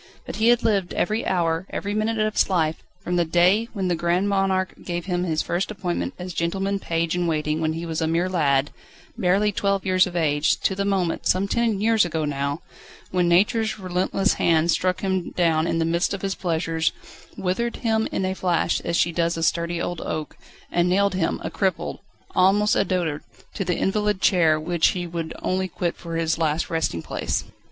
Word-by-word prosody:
But - - -6
he 220 - +2
had 240 0 +4
lived 200 -5 +1
every 215 +5 0
hour, 170 0 0
every 205 0 -3
minute 215 +2 0
of 215 0 +1
his - - +2
life, 160 -4 0 0.2
from 180 -2 -2
the 175 - +3
day 180 +7 +3
when 195 -4 -2
the 180 - +1
Grand 175 +4 +1
Monarque 195 -1 +1
gave 175 -1 -4
him 180 -1 -1
his 160 -3 0
first 175 +3 -1
appointment 185 -4 -3
as 180 0 -6
gentleman 195 +4 -1
page 165 -2 -1
in 175 -1 0
waiting 155 -1 -1
when 160 0 0
he 165 +1 -5
was 165 -1 -3
a 160 - +1
mere 170 +3 +1
lad, 145 -6 +1 0.4
barely 195 +3 +2
twelve 200 -1 0
years 185 0 +4
of 175 - -8
age, 150 -3 +2
to - - +1
the 200 +1 -2
moment 190 -4 0
some 190 +2 +2
ten 230 -1 +1
years 220 +1 +3
ago 160 -3 -1
now 140 +1 -2 0.5
when 180 -1 +2
Nature's 215 +6 +2
relentless 190 +1 0
hand 165 0 +3
struck 185 +1 0
him 190 -2 -1
down 165 -2 +2
in - - 0
the 165 - +1
midst 170 +4 +1
of 195 - -10
his 195 -1 0
pleasures, 165 -3 -1 0.5
withered 215 +6 -1
him 220 -2 0
in 190 - -1
a 190 - -1
flash 180 -3 0
as 170 0 -2
she 170 - +2
does 170 0 0
a 165 - -2
sturdy 170 +1 0
old 175 -1 -3
oak, 155 -1 -4 0.4
and 175 0 +2
nailed 200 +1 +2
him 185 -3 0
a - - -4
cripple, 190 -4 -1 0.4
almost 200 +3 +4
a - - +3
dotard 175 -5 -1 0.3
to 195 - -2
the 180 -1 -1
invalid 210 0 0
chair 165 -6 +3
which 165 +1 +2
he 175 - -3
would 165 -1 -4
only 185 0 0
quit 175 -1 -2
for 165 -1 -7
his 165 0 0
last 160 0 0
resting 160 - -1
place. - - -2
180 Hz, 205 wpm, -23 LUFS, 165-195 Hz, 0.5 s, had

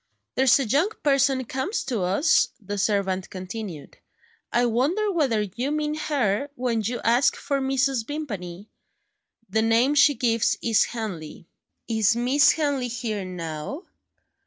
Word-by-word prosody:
"There's 265 +1 +4
a 270 - 0
young 285 - +2
person 275 -2 +2
comes 265 - -3
to 235 -6 -2
us," 195 - +3
the 205 -1 -5
servant 190 -2 0
continued. 185 -4 -8 0.5
"I 240 +1 +2
wonder 295 - +1
whether 265 - +1
you 235 +7 -4
mean 300 0 -1
her, 285 -5 -1
when 245 -4 -1
you 235 +3 -3
ask 240 +4 +3
for 280 -1 -2
Mrs. 265 -3 0
Vimpany? 205 - -6 0.8
The 220 +3 0
name 230 +5 +3
she 290 0 +5
gives 230 -1 +1
is 225 -2 +3
Henley." 185 -9 -6 0.4
"Is 220 -1 +2
Miss 255 +4 +4
Henley 285 -5 -1
here, 225 -4 -3
now?" 175 - -6
240 Hz, 135 wpm, -24 LUFS, 205-275 Hz, 0.8 s, she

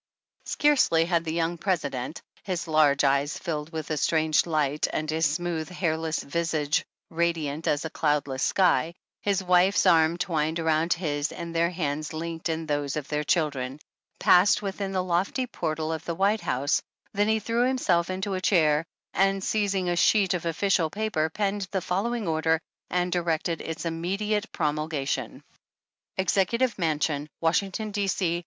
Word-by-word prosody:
Scarcely 260 - +3
had 170 -1 0
the 160 - -2
young 170 0 -1
President 150 -7 -2
— - - -30
his 180 -4 -3
large 150 -3 +4
eyes 140 +2 +2
filled 155 -3 -4
with 160 -1 -5
a 155 - 0
strange 155 +2 +2
light, 150 -2 +1
and 155 - -2
his 160 +1 +2
smooth, 165 +1 -2
hairless 160 -3 -1
visage 155 -1 0 0.3
radiant 165 -2 -1
as 145 +1 +1
a - - -2
cloudless 145 -4 0
sky, 170 -4 +2 0.3
his 200 -2 0
wife's 180 +1 +4
arm 160 +1 +4
twined 165 -3 -1
around 160 +1 +2
his, 150 -4 -2
and 170 -1 -6
their 170 +1 +3
hands 155 -3 -3
linked 165 +1 -4
in 160 0 -2
those 145 -2 -1
of 150 -2 -4
their 150 0 -1
children 140 -4 0 0.2
— - - -46
passed 185 +3 +5
within 195 0 -3
the 185 -1 0
lofty 185 +8 0
portal 160 -7 -3
of 160 0 -5
the 170 - -3
White 200 +4 +2
House, 140 +3 0 0.3
than 205 0 +2
he 220 0 +3
threw 230 +3 +1
himself 185 -10 +1
into 190 +2 -2
a 185 - -2
chair, 155 -5 +3 0.3
and 195 0 +2
seizing 200 -4 0
a 175 - +1
sheet 195 +2 +3
of 170 -2 -2
official 165 -1 +1
paper 200 -5 -1
penned 200 +2 -2
the 195 - -1
fol 185 +3 -1
lowing 235 -4 -2
order, 160 0 +1 0.3
and 180 0 0
directed 170 -1 -1
its 160 +1 -5
immediate 195 +6 -2
promulga 150 -2 -2
tion: - - -3 0.7
Executive 200 +6 +1
Mansion, 150 -2 0
Washington, 195 +6 0
D. 200 -1 -1
C. 175 -3 0
165 Hz, 165 wpm, -26 LUFS, 155-190 Hz, 0.7 s, passed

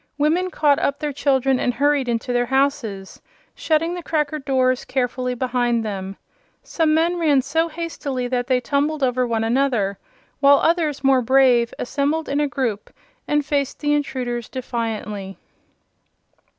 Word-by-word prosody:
Women 325 +5 +1
caught 295 -5 +2
up 280 - 0
their 295 -1 -3
children 270 -2 +1
and 245 - 0
hurried 285 -2 +1
into 235 +1 -2
their 245 0 +1
houses, 260 -8 -1 0.3
shutting 325 +2 0
the 355 - -5
cracker 305 -2 -1
doors 255 -2 +1
carefully 250 -1 -2
behind 245 -2 0
them. 195 -2 -5 0.5
Some 315 -2 +1
men 340 +2 +1
ran 290 -5 +3
so 325 +5 0
hastily 305 -6 -4
that 245 -1 -1
they 255 -2 +2
tumbled 285 +4 -1
over 250 -1 +1
one 225 -1 -1
another, 230 -5 0 0.4
while 280 0 +6
others, 315 -4 0
more 270 -1 +4
brave, 245 -1 +4
assembled 295 +5 -1
in 285 +1 0
a 295 - +1
group 240 -6 -3 0.4
and 295 -1 +1
faced 280 -2 -1
the 295 -1 +1
intruders 250 -5 -2
defiantly. 220 -6 -4
270 Hz, 150 wpm, -21 LUFS, 245-295 Hz, 0.5 s, while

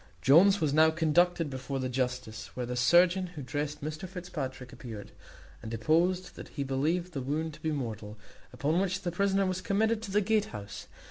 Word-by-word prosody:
Jones 190 +9 +6
was 150 -5 +1
now 160 +1 +6
conducted 165 +1 +2
before 135 0 -4
the 130 -1 -2
justice, 125 -4 -3
where 125 - -3
the 125 +1 -4
surgeon 175 +8 +4
who 165 -5 -8
dressed 145 +3 -4
Mr 155 +4 -5
Fitzpatrick 135 -9 -6
appeared, 110 -5 -9 0.5
and 110 - -7
deposed 170 - +1
that - - -9
he 140 - -4
believed 160 +7 -1
the 135 - -3
wound 155 +4 -2
to - - -14
be 160 - -1
mortal; 110 -6 -5 0.3
upon 155 +5 0
which 190 -1 -1
the 175 - -1
prisoner 195 +2 +1
was 185 0 -2
committed 220 +1 +1
to 225 - -7
the 200 +2 +3
Gatehouse. 190 - -2
155 Hz, 185 wpm, -30 LUFS, 130-180 Hz, 0.5 s, Jones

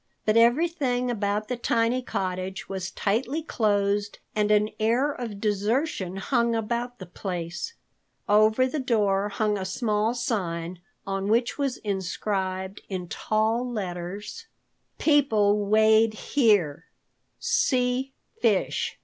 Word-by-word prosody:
But 215 - +2
everything 250 0 +2
about 210 -1 -1
the 250 - -2
tiny 235 +1 +1
cottage 185 -4 -3
was 190 -1 -4
tightly 235 +11 -1
closed, 205 -5 0 0.2
and 210 -1 +1
an 210 0 +3
air 240 +7 +2
of 230 -7 -6
desertion 210 - 0
hung 235 +3 +1
about 235 +2 -2
the 185 - -8
place. 180 - -5 0.5
Over 215 +4 +4
the 260 +4 -2
door 205 -6 +1
hung 210 0 0
a - - -3
small 210 +3 0
sign 180 - -3 0.2
on 195 0 -2
which 235 +6 +1
was 275 -3 0
inscribed 190 -1 -3
in 180 -3 -4
tall 225 +3 0
letters: 200 - -5 0.5
PEOPLE 210 -9 +3
WEIGHED 220 +1 +5
HERE. 205 - +2 0.5
C. 255 +1 +1 0.3
FISH. 220 -5 +1
215 Hz, 115 wpm, -26 LUFS, 195-245 Hz, 0.5 s, WEIGHED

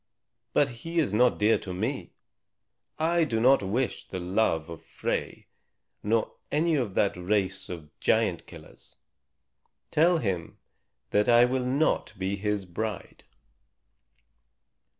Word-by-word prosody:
But 145 - +3
he 165 +1 -5
is 150 -11 +2
not 125 +3 +4
dear 105 +2 +3
to 90 -2 -6
me. - - -3 0.8
I 170 +2 +2
do 115 -8 0
not 130 +4 +5
wish 115 +7 -2
the 95 - -5
love 90 -3 0
of 85 -1 -9
Frey, - - -4 0.6
nor 110 +1 0 0.2
any 165 +3 +2
of 120 -10 -1
that 100 - +2
race 95 +1 -1
of 80 -4 -8
giant - - +1
killers. - - -15 1.0
Tell 170 +3 +4
him 95 - -3 0.5
that 105 +3 +2
I 120 0 +7
will 125 0 -1
not 135 -5 0
be 95 +1 -1
his 105 0 -2
bride." 105 +3 -5
110 Hz, 130 wpm, -27 LUFS, 95-130 Hz, 1.0 s, I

